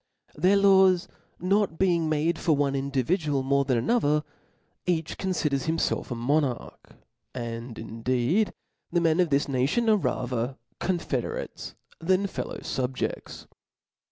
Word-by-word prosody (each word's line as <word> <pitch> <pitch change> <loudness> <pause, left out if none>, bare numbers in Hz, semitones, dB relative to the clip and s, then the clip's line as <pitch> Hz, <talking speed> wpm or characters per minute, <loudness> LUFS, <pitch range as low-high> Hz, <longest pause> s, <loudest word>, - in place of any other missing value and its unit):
Their 190 +3 +3
laws 190 -2 +5 0.3
not 195 -1 +1
being 170 -4 +2
made 155 +2 +1
for 160 -3 +2
one 140 -1 +1
individual 140 - 0
more 140 +1 +2
than 130 -3 +1
another, 150 - +2 0.6
each 165 -3 0
confiders 150 -8 -1
himfelf 160 0 0
as - - -13
a - - -5
mo 140 +7 +2
narch; 130 -5 -3 0.6
and, 115 -1 -5
indeed, 125 - 0 0.4
the 175 - +2
men 165 0 +2
of 180 -2 +3
this 140 +1 +2
nation 140 - +1
are 215 - +5
ra 155 - -1
ther 125 +1 -2 0.2
confederates 170 -9 -3 0.2
than 185 +4 +2
fellow 195 - -4
fubjeds. 130 0 -3
150 Hz, 135 wpm, -27 LUFS, 130-180 Hz, 0.6 s, laws